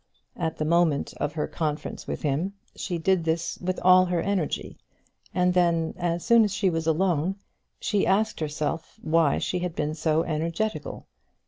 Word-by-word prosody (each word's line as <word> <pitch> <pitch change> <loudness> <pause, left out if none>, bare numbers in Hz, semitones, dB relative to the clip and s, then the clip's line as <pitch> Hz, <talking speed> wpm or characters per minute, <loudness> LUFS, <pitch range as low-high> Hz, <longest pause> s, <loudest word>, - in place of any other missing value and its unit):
At 160 -2 -2
the 155 - -1
moment 165 -3 +2
of 145 - -2
her 150 -1 -2
conference 155 -2 -4
with - - -4
him, 155 +7 0 0.2
she 180 -4 -3
did 180 +1 +2
this 165 +1 -1
with 185 +1 -2
all 185 0 +7
her 175 -1 0
energy; 190 -4 -2 0.5
and 180 0 +2
then, 170 -2 +2
as 175 -1 -2
soon 235 -1 +6
as 210 - 0
she 195 -1 +1
was 165 -1 -2
alone, 175 +1 +1 0.4
she 205 -2 +1
asked 215 +3 +2
herself 155 +1 -3
why 160 -2 +3
she 180 - -1
had 175 -1 -3
been 150 0 -1
so 160 0 +1
energetical. 165 +2 -3
170 Hz, 165 wpm, -26 LUFS, 155-185 Hz, 0.5 s, all